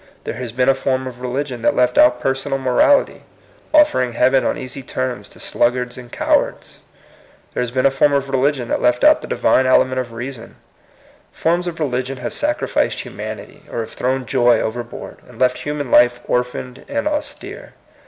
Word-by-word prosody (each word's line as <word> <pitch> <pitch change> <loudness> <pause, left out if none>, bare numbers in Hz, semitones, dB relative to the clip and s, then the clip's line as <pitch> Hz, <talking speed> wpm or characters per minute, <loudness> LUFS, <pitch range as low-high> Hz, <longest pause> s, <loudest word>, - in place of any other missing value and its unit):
There - - -4
has 120 0 -6
been 125 +2 0
a 135 - +6
form 130 0 -1
of 125 -1 -8
religion 125 0 -3
that - - +2
left 125 0 +2
out 125 0 +5
personal 135 +2 -1
morality, 135 - +2 0.5
offering 295 - +3
heaven 130 +3 +3
on - - 0
easy 130 +1 -7
terms 130 -1 -4
to - - -16
sluggards 125 +1 0
and 125 -2 -11
cowards; - - -1 0.7
there - - -1
has 125 - -1
been 130 +2 0
a 135 - +5
form 135 +2 +3
of 140 -1 0
religion 135 -1 0
that - - 0
left 125 0 +2
out - - +6
the - - -8
divine 130 - +2
element 130 0 +3
of 125 -2 -4
reason: 120 0 -7 0.8
forms 175 +2 0
of 165 -1 -5
religion 130 -2 -2
have 125 -1 -5
sacrificed 300 +1 0
humanity, - - -8
or 115 - -2
have 110 - -8
thrown 130 +1 -1
joy 120 -1 +3
overboard, 120 +1 -5
and 120 - -14
left 125 +1 +2
human 145 -3 -4
life 120 0 +5
orphaned 125 +1 -3
and 285 +1 -1
austere. 295 -1 -5
130 Hz, 180 wpm, -19 LUFS, 125-135 Hz, 0.8 s, a